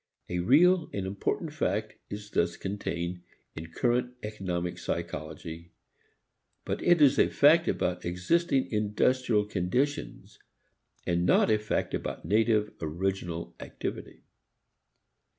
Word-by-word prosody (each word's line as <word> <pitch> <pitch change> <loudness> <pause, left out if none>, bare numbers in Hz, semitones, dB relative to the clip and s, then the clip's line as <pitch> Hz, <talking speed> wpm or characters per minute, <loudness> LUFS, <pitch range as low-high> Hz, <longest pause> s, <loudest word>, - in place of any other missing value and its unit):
A 90 - -1
real 165 - +4
and 100 -2 -3
important 100 - -2
fact 110 -8 -1 0.2
is 105 0 -7
thus 85 0 0
contained 90 -3 -4 0.3
in 80 +1 -6
current 125 +4 0
economic 90 -5 -3
psychology, 85 +1 -5 0.9
but - - -3
it 175 -3 +5
is 140 -1 +5
a - - +5
fact 165 +4 +5
about 90 0 -1
existing 130 - +1
industrial 105 +1 +1
conditions 105 +9 -2 0.7
and 85 0 +1
not 90 - +4
a 105 - +3
fact 110 - -2
about - - -4
native, 110 0 +2
original 85 +1 -3
activity. - - -6
105 Hz, 115 wpm, -29 LUFS, 90-125 Hz, 0.9 s, it